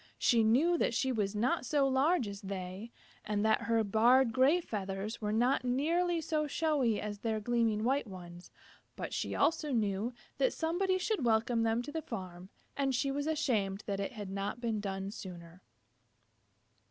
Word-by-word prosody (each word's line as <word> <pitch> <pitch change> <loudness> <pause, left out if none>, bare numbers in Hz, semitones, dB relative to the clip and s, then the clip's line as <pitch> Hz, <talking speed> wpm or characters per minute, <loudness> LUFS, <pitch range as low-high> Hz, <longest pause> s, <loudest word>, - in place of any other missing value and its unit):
She 230 -2 +3
knew 300 +10 +3
that 235 - +1
she 265 +1 +1
was 210 -4 -1
not 235 +5 +1
so 280 +1 +2
large 270 0 +2
as 200 0 -7
they, 190 +2 -6 0.3
and 210 0 -1
that 220 0 +3
her 230 -1 +1
barred 230 +4 +4
gray 270 +7 +4
feathers 200 - -4
were 210 -1 -1
not 245 +5 +2
nearly 330 +8 +1
so 305 -1 -1
showy 280 -8 +1
as 205 -1 -5
their 220 0 -1
gleaming 225 -1 +1
white 265 +1 +1
ones, 175 -2 -10 0.5
but - - -5
she - - -2
also 305 0 +1
knew 215 -1 0 0.3
that - - +2
somebody 370 +4 0
should 390 - -1
welcome 230 0 +2
them 225 +1 +1
to 295 - -7
the 320 +1 -3
farm, 185 - -7 0.3
and 270 -2 0
she 275 +3 0
was 285 +2 -2
ashamed 215 -10 0
that 200 -1 -2
it 200 +7 -3
had 205 -4 -7
not 200 +4 -3
been 230 -3 -1
done 195 -1 -4
sooner. 175 -3 -10
230 Hz, 175 wpm, -32 LUFS, 205-275 Hz, 0.5 s, barred